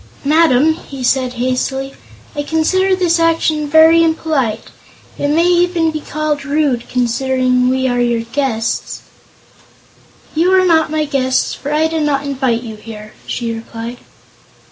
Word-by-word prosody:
"Madam," 310 -1 +4
he 275 -5 -9
said 255 0 +1
hastily, 255 +2 -2 0.4
"I 290 - -1
consider 375 +6 +1
this 345 -2 +1
action 320 -2 +1
very 320 +2 +6
impolite. 300 -9 -1 0.5
It 285 - 0
may 320 +4 +2
even 350 -2 +2
be 310 -1 -5
called 300 -1 -3
rude, 280 -4 -1
considering 250 +1 +1
we 260 0 0
are 245 -1 0
your 235 -1 +1
guests." 230 -1 -3 1.3
"You 335 +4 +2
are 370 - +2
not 325 -2 +3 0.2
guests, 260 -2 0
for 285 - -6
I 305 +1 +2
did 320 0 -1
not 285 -2 0
invite 260 -4 -1
you 220 -2 -8
here," 215 -1 -11
she 230 -2 -3
replied. 230 +1 -7
280 Hz, 140 wpm, -16 LUFS, 250-320 Hz, 1.3 s, very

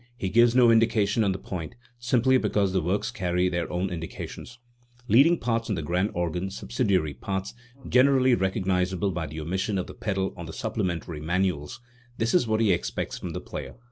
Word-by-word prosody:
He 95 - -2
gives 120 +4 +4
no 120 -2 +6
indications 110 -1 +3
on 100 - +2
the 95 - -2
point, 90 -4 -6 0.2
simply 125 +2 +3
because 100 -5 0
the 95 - +2
works 90 +5 -1
carry 90 -1 0
their 85 -2 -2
own 90 +2 -1
indications. 85 +7 -7 0.5
Leading 145 +9 +5
parts 115 -3 -1
on 105 - 0
the 85 - -3
grand 90 +6 0
organ, 85 +2 -2
subsidiary 100 - -1
parts, 95 +3 -4 0.3
(generally 130 0 +4
recognisable 95 -2 0
by 85 -2 -3
the 80 +2 -7
omission 95 +6 -2
of 90 - -2
the - - -10
pedal) 95 -2 -2
on 85 -3 -8
the 80 - -8
supplementary 90 -7 -3
manuals, 85 - -1 0.4
this 115 +1 0
is 175 -10 +3
what 110 0 +1
he 110 -3 +4
expects - - -3
from - - -5
the - - -4
player. - - -7
95 Hz, 185 wpm, -26 LUFS, 90-115 Hz, 0.5 s, no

